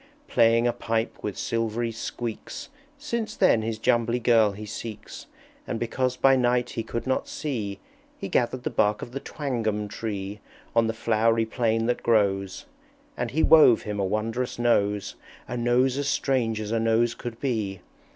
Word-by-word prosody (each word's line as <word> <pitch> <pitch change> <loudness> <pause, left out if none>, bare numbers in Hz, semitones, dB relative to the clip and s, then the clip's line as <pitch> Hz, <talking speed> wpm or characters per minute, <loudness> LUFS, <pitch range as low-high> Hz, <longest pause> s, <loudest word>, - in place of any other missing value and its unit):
Playing 115 +1 +4
a 120 - +2
pipe 115 -1 -2
with 105 - -4
silvery 115 +1 -1
squeaks, 115 0 -6 0.3
Since 235 -7 -3
then 185 - +4
his 110 0 -3
Jumbly 115 +2 +2
Girl 115 -4 +4
he 105 +2 -8
seeks; 110 +1 -8 0.4
And 115 - -3
because 125 +2 -1
by 135 0 +5
night 125 -1 +1
he 115 - -3
could 115 +1 -5
not 130 0 0
see, 110 -10 -4 0.4
He - - -5
gathered 125 +4 0
the - - -2
bark 105 0 +1
of 120 - -8
the 135 - -4
Twangum 115 -9 -2
Tree 100 -1 -5 0.4
On 115 -1 +4
the 115 - -2
flowery 115 0 +2
plain 115 0 0
that 120 +1 0
grows. 100 -4 +1 0.5
And - - -2
he 160 +3 0
wove 150 -8 +7
him 105 -1 -4
a - - +1
wondrous 110 +5 -2
Nose, 105 -4 +1 0.3
A 125 - -4
Nose 125 +2 +2
as 145 - -1
strange 125 -6 0
as 105 0 -4
a 115 - +1
Nose 115 +1 +2
could 115 -1 -7
be! 110 -8 -2
115 Hz, 170 wpm, -26 LUFS, 110-125 Hz, 0.5 s, wove